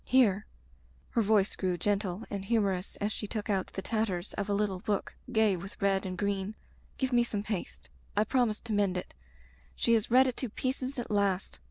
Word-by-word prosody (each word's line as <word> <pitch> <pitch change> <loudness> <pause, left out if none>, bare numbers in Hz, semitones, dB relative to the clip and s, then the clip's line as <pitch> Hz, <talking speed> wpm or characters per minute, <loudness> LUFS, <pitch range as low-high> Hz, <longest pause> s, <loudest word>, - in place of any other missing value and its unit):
"Here," 215 -6 +3 0.6
her 230 - +2
voice 210 -2 +3
grew 185 -2 0
gentle 200 +1 0
and 200 -2 -3
humorous 195 -3 0
as 205 +1 -1
she 210 - -4
took 215 0 -2
out 190 -2 +1
the 195 - -4
tatters 210 -5 -1
of 200 0 -3
a - - +2
little 200 -2 0
book 205 +1 -2 0.2
gay 220 -4 +4
with 190 +3 -8
red 195 -1 +2
and 185 -1 -4
green, 200 +1 -1 0.4
"give 260 -2 0
me 240 0 +5
some 210 -4 -3
paste. 210 -4 -4 0.3
I 210 - +6
promised 235 -3 +1
to 225 - -2
mend 200 -3 +2
it. 180 - -5 0.6
She 235 - +2
has 225 -1 +2
read 255 +2 +7
it 255 -2 -1
to 255 - -2
pieces 260 +4 -3
at 245 - -4
last. 200 -2 +1
205 Hz, 200 wpm, -31 LUFS, 195-225 Hz, 0.6 s, read